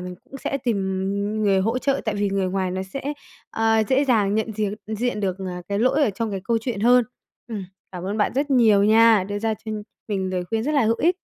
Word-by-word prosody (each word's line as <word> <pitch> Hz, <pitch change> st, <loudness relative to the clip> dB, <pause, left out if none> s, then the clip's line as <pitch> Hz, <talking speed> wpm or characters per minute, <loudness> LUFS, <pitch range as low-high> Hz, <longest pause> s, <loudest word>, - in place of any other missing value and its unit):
mình 180 Hz, 0 st, -6 dB
cũng 270 Hz, +1 st, -10 dB
sẽ 275 Hz, +1 st, -3 dB
tìm, 235 Hz, -3 st, +1 dB
ừm, 200 Hz, +2 st, -2 dB
người 195 Hz, -2 st, +3 dB
hỗ 225 Hz, +6 st, 0 dB
trợ 275 Hz, +1 st, 0 dB
tại 215 Hz, -2 st, -1 dB
vì 205 Hz, 0 st, 0 dB
người 195 Hz, -1 st, 0 dB
ngoài 185 Hz, -1 st, -1 dB
nó 185 Hz, +1 st, -3 dB
sẽ, 275 Hz, +9 st, -5 dB, 0.4 s
ờ, 225 Hz, 0 st, +2 dB
dễ 270 Hz, +2 st, +3 dB
dàng 210 Hz, -6 st, +2 dB
nhận 220 Hz, 0 st, -1 dB
diệc 210 Hz, -1 st, -1 dB
diện 220 Hz, 0 st, -2 dB
được, 190 Hz, -2 st, -1 dB
à, 180 Hz, -2 st, -5 dB
cái 200 Hz, 0 st, -1 dB
lỗi 255 Hz, +6 st, +3 dB
ở 220 Hz, -, +1 dB
trong 220 Hz, +3 st, -3 dB
cái 195 Hz, -1 st, -3 dB
câu 230 Hz, -1 st, +1 dB
chuyện 225 Hz, -4 st, -3 dB
hơn. 245 Hz, +1 st, +5 dB, 0.4 s
Ừm, 205 Hz, -4 st, -5 dB, 0.3 s
cảm 180 Hz, 0 st, -6 dB
ơn 200 Hz, +3 st, -2 dB
bạn 210 Hz, -, +1 dB
rất 285 Hz, +2 st, 0 dB
nhiều 220 Hz, -6 st, +5 dB
nha, 220 Hz, -2 st, +5 dB
đưa 205 Hz, -, -2 dB
ra 220 Hz, +1 st, 0 dB
cho 220 Hz, 0 st, -7 dB, 0.4 s
mình 190 Hz, -2 st, -1 dB
lời 180 Hz, -1 st, -2 dB
khuyên 225 Hz, 0 st, 0 dB
rất 300 Hz, +4 st, -1 dB
là 280 Hz, -, +3 dB
hữu 225 Hz, +1 st, +2 dB
ích. 355 Hz, +3 st, +2 dB
215 Hz, 250 wpm, -23 LUFS, 195-235 Hz, 0.4 s, hơn